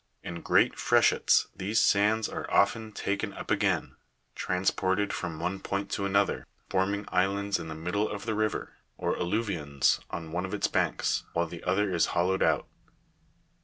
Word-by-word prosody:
In 85 -1 -6
great - - +3
freshets - - +4
these 105 +4 0
sands 105 +2 +3
are - - -6
often 110 +2 +2
taken 100 -1 -2
up - - -7
again, - - 0 0.4
transported 95 +2 0
from 85 -3 -4
one 90 +3 -2
point 100 +1 -3
to 100 - -1
another, 100 0 +1 0.2
forming 100 +2 0
islands 100 +2 +1
in 85 - -6
the 80 - -6
middle 90 +7 -1
of 105 -1 -6
the 110 - -1
river, 110 0 -2 0.2
or - - -1
alluvions 85 - 0
on 80 -2 -6
one 90 +2 -2
of 95 +2 -3
its 105 - 0
banks, - - 0
while 85 0 +1
the 85 0 -9
other 95 +1 +1
is 85 - +3
hollowed 95 +2 +2
out. - - +2
95 Hz, 165 wpm, -29 LUFS, 85-100 Hz, 0.4 s, freshets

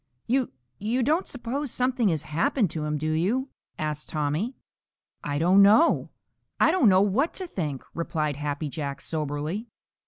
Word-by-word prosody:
"You 260 +1 +1 0.3
you 235 +5 0
don't 315 +8 +1
suppose 255 +2 -3
something 250 -3 +1
has 160 -4 -1
happened 170 - +1
to 155 -2 -3
him, 150 0 -1
do 155 +2 -1
you?" 215 - 0 0.3
asked 150 -1 -4
Tommy. 155 - -1 0.7
"I 145 0 -2
don't 180 +6 +5
know. 215 +12 +5 0.5
I - - +5
don't 275 - +5
know 185 0 +5
what 215 - +1
to 375 - -3
think," 150 - -4
replied 155 -3 -2
Happy 145 +1 -3
Jack, 140 -2 -4
soberly. 155 +7 -3
180 Hz, 155 wpm, -26 LUFS, 150-245 Hz, 0.7 s, don't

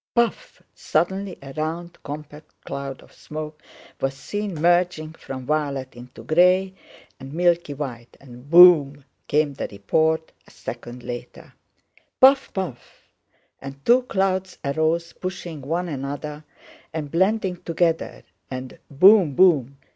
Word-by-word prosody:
"Puff!"—suddenly 200 - -1
a 135 0 -9
round 165 +3 -4
compact 150 +1 -10
cloud 140 -1 -6
of - - -20
smoke 155 0 -8 0.4
was 135 0 -1
seen 205 +6 -4
merging 170 -1 +1
from 130 -5 -8
violet 140 -3 -2
into 125 +1 -12
gray 180 +3 +3 0.5
and 135 +1 -9
milky 170 -4 +1
white, 125 -5 -7
and 125 0 -14
"boom!" 155 -5 +7 0.2
came 150 -1 +1
the 135 - -4
report 160 +11 0 0.2
a - - -17
second 120 +1 -8
later. 120 0 -8 0.7
"Puff! 270 +1 +6
puff!"—and 140 -3 -10
two 245 +2 +5
clouds 190 -5 -1
arose 160 +4 0
pushing 175 -4 -6
one 165 +6 -2
another 145 +1 -5 0.5
and 155 -3 -5
blending 190 +1 +1
together; 165 -1 -1 0.3
and 130 0 -7
"boom, 180 0 +6
boom!" 140 -7 +4
155 Hz, 115 wpm, -23 LUFS, 140-180 Hz, 0.7 s, boom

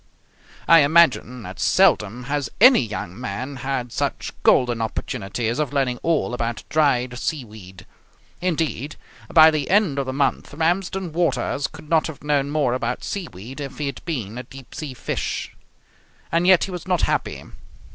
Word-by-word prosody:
I 165 - +8
imagine 140 -5 +3
that 95 0 -9
seldom 125 - +3
has 145 0 -2
any 255 +4 +8
young 110 -2 -5
man 130 +5 -5
had 125 -1 -3
such - - -3
golden 120 -2 +3
opportunities 115 +1 -3
of 150 -2 -1
learning 130 -3 0
all 160 -7 0
about 120 -1 -3
dried 130 -5 +1
seaweed. 110 - -6 0.6
Indeed, 155 -6 -2 0.4
by 160 -1 +8
the 150 -3 -2
end 190 -8 +3
of 135 - -2
the - - -1
month 135 +1 -1
Ramsden 175 +2 -1
Waters 165 -4 0
could - - -13
not 160 0 +2
have 160 -3 -9
known 145 -1 +1
more 145 -5 +1
about 125 -1 -2
seaweed 135 - -6
if 140 -2 -7
he 150 - -3
had 140 -2 -5
been 120 - -4
a - - -6
deep 135 -1 -13
sea 145 -5 -6
fish. - - -4 0.8
And 170 +2 +2
yet 185 -2 +6
he 195 - -4
was 180 -1 -7
not 180 -3 +1
happy. - - -1
140 Hz, 160 wpm, -22 LUFS, 120-160 Hz, 0.8 s, I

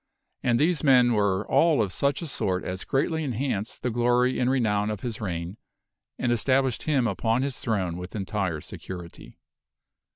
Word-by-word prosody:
And 120 -2 +2
these 165 +2 +2
men 125 -4 +5
were 100 -2 +1
all 155 +1 +4
of 100 -4 0
such 140 +4 0
a - - -3
sort 95 -9 -1
as 90 +1 -4
greatly 160 +4 0
enhanced 125 -5 -3
the 125 - 0
glory 120 +2 +2
and 125 - +2
re 135 0 +2
nown 105 -2 +1
of 105 - -5
his 115 -3 -5
reign 90 0 -4 0.6
and 120 - 0
established 130 +1 +1
him 140 -5 +1
upon 115 +3 0
his 140 -2 -3
throne 95 -7 -1
with 90 +3 -8
entire 95 -5 -2
security. 90 0 -9
115 Hz, 170 wpm, -26 LUFS, 100-130 Hz, 0.6 s, men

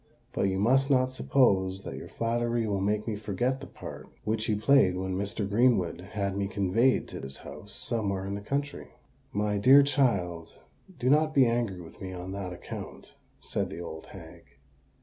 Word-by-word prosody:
"But 100 - +1
you 95 - -1
must 130 +7 +3
not 130 -2 +3
suppose 100 -8 +2
that - - -6
your - - -8
flattery 115 0 -1
will 100 -2 -1
make 105 +2 0
me 110 - -1
forget 110 +6 -1
the - - -8
part - - -9
which 110 +1 -1
you 105 - +2
played 105 -5 +4
when 95 0 -2
Mr. 100 +1 -2
Greenwood 100 -5 +2
had 100 -2 -1
me 100 0 -1
conveyed 105 +6 +2
to - - -7
his 70 0 -7
house - - -10
somewhere 100 -4 -2
in 100 - -3
the 100 - -4
country." 140 +6 -3 0.4
"My 105 0 0
dear 135 +7 +8
child, 100 - 0 0.4
do 125 - -2
not 155 +3 +4
be 135 -2 +7
angry 115 -6 0
with 80 - -13
me 95 -1 -5
on 90 +1 -6
that 95 -2 -4
account," 90 - -8 0.3
said - - -2
the 85 - -7
old 80 -2 -8
hag. - - -12
105 Hz, 185 wpm, -28 LUFS, 95-125 Hz, 0.4 s, dear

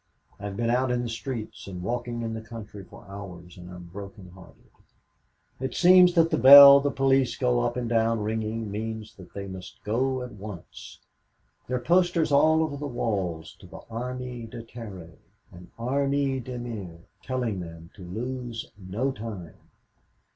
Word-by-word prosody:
I've 100 -1 -6
been 115 0 0
out 130 +1 +1
in 125 0 0
the 120 - -4
streets 115 -3 -6
and 90 -2 -7
walking 120 +1 -3
in 115 -1 -3
the 110 - -5
country 110 -3 -10
for 95 - -15
hours 90 -3 -10
and 90 -1 -11
I'm 90 -1 -10
broken 100 +1 -10
hearted. 95 -1 -17 0.9
It 130 0 -4
seems 180 0 +6
that 165 -1 +4
the - - +1
bell 140 +2 +11
the 145 +1 0
police 135 -1 +2
go 125 -1 +2
up 120 +1 -1
and 120 -1 -2
down 115 -1 +1
ringing 110 0 -3
means 110 +1 -5
that 95 - -14
they 100 -1 -5
must 95 -1 -10
go 130 +4 0
at 125 - -8
once. 100 -4 -10 0.7
There 125 - -1
are - - -3
posters 175 +1 +2
all 155 +3 +4
over 145 -3 -3
the 145 +1 -4
walls 95 - -3
to - - -14
the - - -11
Armée 125 0 -5
de 115 0 -8
Terre 105 -8 -10 0.3
and 90 0 -13
Armée 135 +1 0
de 125 +1 -6
mer, 100 -9 -7 0.2
telling 125 -6 -2
them 85 -1 -9
to 95 - -12
lose 120 +5 -5
no 105 +9 -2
time. 105 -8 -7
115 Hz, 170 wpm, -26 LUFS, 100-130 Hz, 0.9 s, bell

